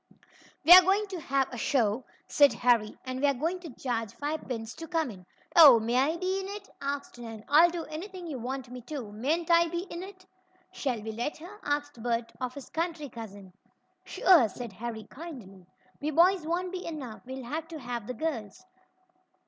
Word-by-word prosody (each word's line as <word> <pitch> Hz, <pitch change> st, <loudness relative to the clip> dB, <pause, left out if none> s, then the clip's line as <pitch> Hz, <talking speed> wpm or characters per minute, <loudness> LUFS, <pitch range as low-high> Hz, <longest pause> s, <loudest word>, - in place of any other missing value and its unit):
"We're 355 Hz, +3 st, +12 dB
going 390 Hz, +3 st, +2 dB
to 370 Hz, -3 st, -5 dB
have 275 Hz, -3 st, 0 dB
a 245 Hz, -, -5 dB
show," 230 Hz, -1 st, +1 dB, 0.2 s
said 285 Hz, -1 st, +5 dB
Harry, 235 Hz, -3 st, +2 dB
"and 255 Hz, 0 st, -4 dB
we're 285 Hz, -1 st, +3 dB
going 330 Hz, +8 st, -1 dB
to 345 Hz, -2 st, -9 dB
charge 230 Hz, -4 st, -2 dB
five 300 Hz, +2 st, -4 dB
pins 230 Hz, -2 st, -4 dB
to 325 Hz, -, -7 dB
come 320 Hz, -7 st, -1 dB
in." 185 Hz, -3 st, -14 dB, 0.3 s
"Oh, 285 Hz, -8 st, +10 dB
may 230 Hz, +2 st, -1 dB
I 280 Hz, +6 st, +2 dB
be 375 Hz, +2 st, -1 dB
in 385 Hz, -, -5 dB
it?" 400 Hz, 0 st, -7 dB
asked 280 Hz, -3 st, -4 dB
Nan. 225 Hz, -2 st, -8 dB
"I'll 320 Hz, +4 st, +7 dB
do 340 Hz, -1 st, -4 dB
anything 360 Hz, +4 st, -7 dB
you 295 Hz, -6 st, -5 dB
want 255 Hz, +1 st, -5 dB
me 250 Hz, 0 st, -7 dB
to. 265 Hz, -9 st, -6 dB
Mayn't 310 Hz, +11 st, -1 dB
I 340 Hz, 0 st, +6 dB
be 345 Hz, +1 st, -3 dB
in 340 Hz, -, -5 dB
it?" 375 Hz, -1 st, -11 dB, 0.5 s
"Shall 255 Hz, -, -3 dB
we 220 Hz, -, -4 dB
let 240 Hz, +7 st, -3 dB
her?" 360 Hz, +7 st, -11 dB
asked 290 Hz, -3 st, -2 dB
Bert 230 Hz, 0 st, -1 dB
of 255 Hz, 0 st, -3 dB
his 280 Hz, -, -9 dB
country 325 Hz, -3 st, -3 dB
cousin. 205 Hz, -5 st, -10 dB, 0.5 s
"Sure," 325 Hz, -, +5 dB
said 235 Hz, -1 st, -8 dB
Harry 225 Hz, +1 st, -6 dB
kindly. 225 Hz, -, -11 dB, 0.3 s
"We 295 Hz, -, -1 dB
boys 340 Hz, +2 st, +4 dB
won't 355 Hz, +2 st, -1 dB
be 370 Hz, -1 st, -5 dB
enough. 275 Hz, -9 st, -6 dB
We'll 260 Hz, 0 st, -6 dB
have 310 Hz, +6 st, -4 dB
to 330 Hz, -1 st, -7 dB
have 240 Hz, -5 st, -5 dB
the 250 Hz, -, -4 dB
girls." 230 Hz, -, -4 dB
280 Hz, 195 wpm, -29 LUFS, 235-335 Hz, 0.5 s, We're